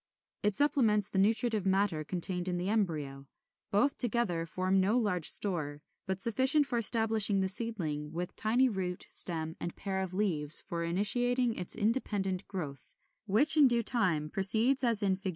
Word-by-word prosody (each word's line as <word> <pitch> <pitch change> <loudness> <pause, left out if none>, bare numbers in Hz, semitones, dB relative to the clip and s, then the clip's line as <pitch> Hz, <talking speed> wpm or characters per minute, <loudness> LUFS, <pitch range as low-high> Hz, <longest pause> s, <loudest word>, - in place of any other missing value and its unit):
It 210 -1 -1
supplements 225 -8 0
the 190 - -2
nutritive 220 +1 0
matter 190 -5 -1
contained 180 +2 -2
in 180 -1 -3
the 180 +2 -4
embryo. 150 -10 -3 0.4
Both 225 +7 0
together 210 -9 0
form 185 +2 -1
no 205 +6 0
large 185 -8 +1
store, 150 -7 -3 0.2
but 190 0 -4
sufficient 260 +7 +1
for 245 -3 -3
establishing 220 -3 +4
the 190 - -1
seedling, 175 -9 -1
with 175 +2 -6
tiny 240 +5 +1
root, 185 -5 -5
stem, 160 -2 +2
and 170 - -6
pair 195 -1 -4
of 185 -1 -5
leaves 165 -7 +4
for 170 -1 -4
initiating 240 +7 0
its 180 -4 -1
independent 205 -4 -2
growth; 145 -9 -9 0.3
which 235 +12 +3
in 295 -3 +5
due 235 -2 +1
time 175 -11 +1
proceeds 225 +8 +2
as 230 -4 0
in 190 -2 0
Fig. 195 0 -5
195 Hz, 165 wpm, -29 LUFS, 175-230 Hz, 0.4 s, in